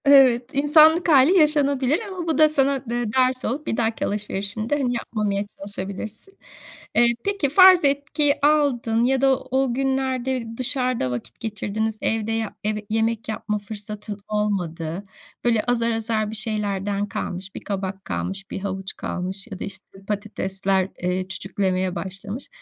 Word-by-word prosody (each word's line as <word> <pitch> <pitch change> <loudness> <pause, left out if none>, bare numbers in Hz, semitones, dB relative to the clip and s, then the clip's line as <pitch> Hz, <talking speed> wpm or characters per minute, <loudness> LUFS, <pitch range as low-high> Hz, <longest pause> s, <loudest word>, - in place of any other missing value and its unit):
Evet, 260 -3 +5
insanlık 310 +4 +5
hâli 300 +5 +6
yaşanabilir 290 -2 +4
ama 365 -3 -6
bu 320 -4 +1
da 310 0 +6
sana 275 -2 +1
de 240 0 -1
ders 255 0 +2
olup 295 +6 -3
bir - - -1
dahaki 225 -1 0
alışverişinde, 210 +5 -2
hani, 250 -2 0
yapmamaya 205 -3 -2
çalışabilirsin. 205 - -6 0.6
Eee, 235 0 +5
peki 400 -8 0
farz 370 +1 +7
etki 285 +1 +2
aldın 255 -7 +2
ya 265 +1 +2
da 270 -1 +4
o 260 -1 -1
günlerde 265 -1 -1
dışarıda 255 - 0
vakit 120 -2 -6
geçirdiniz. 220 0 -3
Evde 220 0 -1
yap 225 -1 -2 0.3
yemek 225 +1 -1
yapma 210 -1 -2
fırsatın 210 0 -6
olmadı. 185 -5 -2 0.4
Böyle, 230 -3 +3
azar 235 -1 +1
azar 220 -1 -1
bir - - -5
şeylerden 205 -2 -1
kalmış, 190 -1 -5
bir - - -6
kabak 195 -1 -4
kalmış, 195 +1 -4
bir - - -4
havuç 190 -1 -4
kalmış 190 +3 -4
ya 190 - -7
da, - - -4
işte, 195 0 -7
patatesler, 195 -2 -1
eee, 180 +1 -1
çüçüklemeye 190 -1 -2
başlamış. 195 +7 -6
225 Hz, 145 wpm, -23 LUFS, 200-265 Hz, 0.6 s, farz